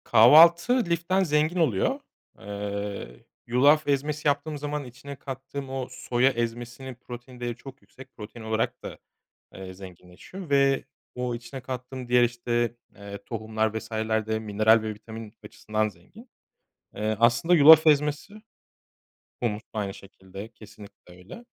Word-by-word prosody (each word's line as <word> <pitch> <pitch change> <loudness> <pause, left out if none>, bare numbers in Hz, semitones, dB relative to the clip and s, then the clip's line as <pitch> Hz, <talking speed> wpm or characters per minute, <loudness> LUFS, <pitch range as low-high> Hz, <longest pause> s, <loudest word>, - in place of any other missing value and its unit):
Kahvaltı 170 - +6
liften 170 +3 +1
zengin 155 0 +1
oluyor. 220 - +1 0.4
Eee, 100 -8 -6 0.2
yulaf 145 +6 +4
ezmesi 145 +2 -1
yaptığım 145 +1 0
zaman 145 0 -4
içine 130 +3 -10
kattığım 135 0 -7
o 130 -1 -4
soya 125 +1 +1
ezmesinin 120 +1 -5
protein 125 +1 -11
değeri 120 -1 -3
çok 135 +2 -13
yüksek. 130 0 -16
Protein 110 +2 -10
olarak 110 0 -2
da, - - -7 0.6
eee, 95 -1 -9
zenginleşiyor 95 - -12
ve 140 -1 +3 0.3
o 125 -1 -2
içine 120 +3 -9
kattığım 125 0 -7
diğer 125 0 +4
işte, 120 0 -1 0.2
eee, 100 0 -9
tohumlar 110 -1 -2
vs.ler 110 -1 -2
de 110 0 -1
mineral 110 +1 +3
ve 110 0 -4
vitamin 110 0 -10
açısından 110 +1 -2
zengin. 150 - -18 0.7
Eee, 110 +1 -1
aslında 120 +9 +4
yulaf 160 +1 +8
ezmesi 150 +5 +2 1.1
Humus 110 -3 -1
aynı 100 -3 -3
şekilde 95 +1 -11
kesinlikle 105 -4 -15
öyle. 95 - -12
120 Hz, 130 wpm, -26 LUFS, 110-140 Hz, 1.1 s, yulaf